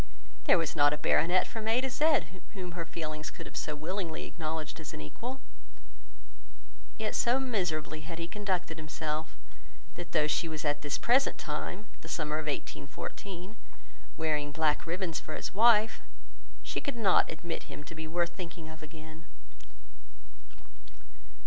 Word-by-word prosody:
There - - +7
was 165 -1 0
not 145 -1 +6
a - - 0
baronet 180 +4 +4
from 220 -1 -5
A 225 +2 +5
to 265 - +1
Z 295 +3 +4 0.3
whom 185 -3 -4
her 170 -1 -3
feelings 155 -2 -3
could - - -9
have - - -9
so 150 - -1
willingly 165 +2 -2
acknowledged 160 -1 -4
as 160 - -6
an - - -6
equal. 240 - -5 1.6
Yet 220 -1 -1
so 245 +3 +4
miserably 170 - 0
had 165 +1 -6
he 170 0 -2
conducted 185 -4 -1
himself, 155 0 -3 0.6
that 175 -1 -7
though 155 -3 +4
she 155 +3 +2
was 155 -1 -3
at 145 0 +2
this 145 -1 0
present 260 +3 +4
time 175 +6 -3 0.2
(the - - -9
summer 155 -1 0
of 155 - -5
1814) 175 - -4 0.6
wearing 150 -2 +1
black 155 +1 +2
ribbons 175 -1 0
for 155 - -6
his - - -4
wife, 225 +1 +6 0.6
she - - -2
could 280 -4 -2
not 200 -5 +5
admit 165 +1 -4
him 150 - -7
to 150 - -8
be 160 0 -5
worth 170 +1 +1
thinking 165 -3 -6
of 160 0 -10
again. 155 +1 -10
165 Hz, 155 wpm, -32 LUFS, 155-195 Hz, 1.6 s, There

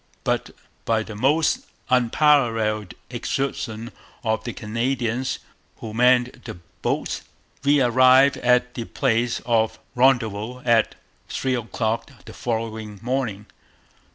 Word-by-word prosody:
But - - 0 0.3
'by 110 -1 +1
the 110 - -8
almost 155 - +2 0.3
unparalleled 115 -6 +2 0.2
exertions 120 -2 -3 0.3
of 110 -1 0
the 120 - -4
Canadians 120 +2 -1 0.4
who 110 -2 -7
manned 125 +1 +3
the 115 - -7 0.3
boats, - - -1 0.4
we 140 -1 +4
arrived 130 +3 +5
at 125 0 +2
the 115 - -5
place 120 -2 0
of 115 -2 +1 0.2
Rendezvous 125 -2 +1
at 115 -2 +3 0.3
3 130 -1 -1
o'clock 115 -1 -2 0.2
the - - -10
following 110 -2 -4
morning.' 120 -5 -2
120 Hz, 110 wpm, -23 LUFS, 110-130 Hz, 0.4 s, arrived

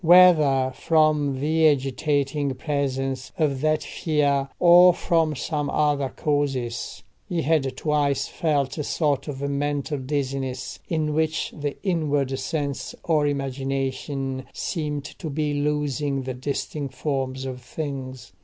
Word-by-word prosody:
Whether 155 -7 +6
from 150 -3 +2
the 160 +3 +3
agitating 140 0 0
presence 135 -2 -2
of 145 -5 +1
that 155 0 +2
fear, 140 -3 0
or 175 0 +7
from 165 -3 +1
some 145 +2 -2
other 145 -3 +1
causes, 135 -9 -2 0.3
he 175 -3 -1
had 140 -3 +1
twice 145 -2 +1
felt 150 -2 -1
a - - -1
sort 145 -1 0
of 140 -1 -3
mental 145 +1 -1
dizziness, 130 -1 -3
in 155 -2 0
which 160 0 0
the 145 -2 -4
inward 145 -8 0
sense 140 0 -3
or 155 -3 +2
imagination 135 -1 -2
seemed 150 -4 -3
to 160 +2 -7
be 150 0 -1
losing 145 -1 -1
the 130 0 -4
distinct 140 +1 -4
forms 135 -2 -2
of 130 -1 -5
things. 130 -3 -6
145 Hz, 125 wpm, -24 LUFS, 135-155 Hz, 0.3 s, or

